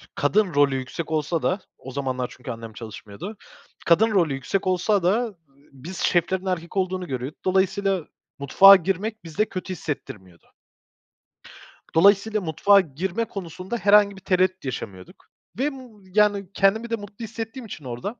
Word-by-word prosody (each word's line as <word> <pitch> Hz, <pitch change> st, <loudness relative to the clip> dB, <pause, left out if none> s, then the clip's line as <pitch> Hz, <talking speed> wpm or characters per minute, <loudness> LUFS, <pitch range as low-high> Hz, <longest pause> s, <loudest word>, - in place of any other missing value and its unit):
kadın 185 Hz, +5 st, +2 dB
rolü 145 Hz, -2 st, +4 dB
yüksek 130 Hz, +5 st, -5 dB
olsa 155 Hz, +2 st, 0 dB
da, 185 Hz, -, +1 dB, 0.2 s
o 130 Hz, -, -10 dB
zamanlar 130 Hz, -2 st, -3 dB
çünkü 125 Hz, 0 st, -7 dB
annem 115 Hz, -1 st, -8 dB
çalışmıyordu, 115 Hz, -, -9 dB, 0.5 s
kadın 215 Hz, +7 st, +4 dB
rolü 170 Hz, -8 st, +2 dB
yüksek 160 Hz, +9 st, -2 dB
olsa 185 Hz, +2 st, +1 dB
da, 190 Hz, +6 st, +3 dB
ııı, 220 Hz, -5 st, -6 dB, 0.4 s
biz 165 Hz, +8 st, -9 dB
şeflerin 180 Hz, +3 st, +1 dB
erkek 180 Hz, 0 st, -3 dB
olduğunu 185 Hz, -1 st, -1 dB
görüyorduk. 130 Hz, +1 st, -6 dB
Dolayısıyla 190 Hz, -1 st, +1 dB, 0.3 s
mutfağa 195 Hz, +8 st, +8 dB
girmek 195 Hz, +4 st, -2 dB
bizde 170 Hz, +6 st, -1 dB
kötü 185 Hz, 0 st, -5 dB
hissettirmiyordu. 105 Hz, -, -7 dB, 1.5 s
Dolayısıyla 200 Hz, +4 st, +4 dB
mutfağa 195 Hz, +5 st, +4 dB
girme 180 Hz, +8 st, -3 dB
konusunda 185 Hz, +2 st, -6 dB
herhangi 205 Hz, -1 st, +5 dB
bir 190 Hz, -, -13 dB
tereddüt 185 Hz, -1 st, +1 dB
yaşamıyorduk 95 Hz, -8 st, -7 dB, 0.3 s
ve, 275 Hz, -, +2 dB
ımm, 255 Hz, -7 st, -9 dB
yani, 205 Hz, -3 st, +3 dB
kendimi 215 Hz, +5 st, +2 dB
de 230 Hz, -, 0 dB
mutlu 205 Hz, +1 st, -9 dB
hissettiğim 225 Hz, +3 st, -7 dB
için 155 Hz, -9 st, -9 dB
orada. 125 Hz, -, -5 dB
185 Hz, 145 wpm, -24 LUFS, 145-205 Hz, 1.5 s, mutfağa